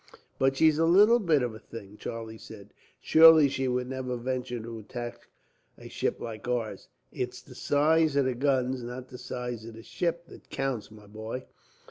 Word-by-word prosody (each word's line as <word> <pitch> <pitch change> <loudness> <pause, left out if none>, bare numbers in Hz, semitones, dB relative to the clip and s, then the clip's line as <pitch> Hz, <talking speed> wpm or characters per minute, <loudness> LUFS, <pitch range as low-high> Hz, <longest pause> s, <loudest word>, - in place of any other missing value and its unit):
"But 135 0 +2
she's 155 0 +4
a 165 - +4
little 210 +7 +6
bit 160 - +2
of 120 -2 -2
a 110 - -10
thing," 105 -3 -11
Charlie 110 0 -7
said. 100 -3 -12 0.3
"Surely 160 -2 +8
she 135 -1 -2
would 125 0 -1
never 130 -1 -4
venture 125 0 -3
to 115 0 -7
attack 120 +2 -7 0.5
a - - -11
ship - - -2
like 115 0 -7
ours." 120 -3 -3 0.2
"It's - - -4
the - - -15
size 155 +1 +2
of 140 -2 +3
the 130 - 0
guns, 130 -1 0
not 125 +2 -7
the 125 - -10
size 125 -2 -5
of 115 0 -10
the 115 - -11
ship, 170 +4 -2
that - - -16
counts, 135 -5 -3
my 105 -1 -15
boy. 110 +5 -7
125 Hz, 185 wpm, -28 LUFS, 115-140 Hz, 0.5 s, Surely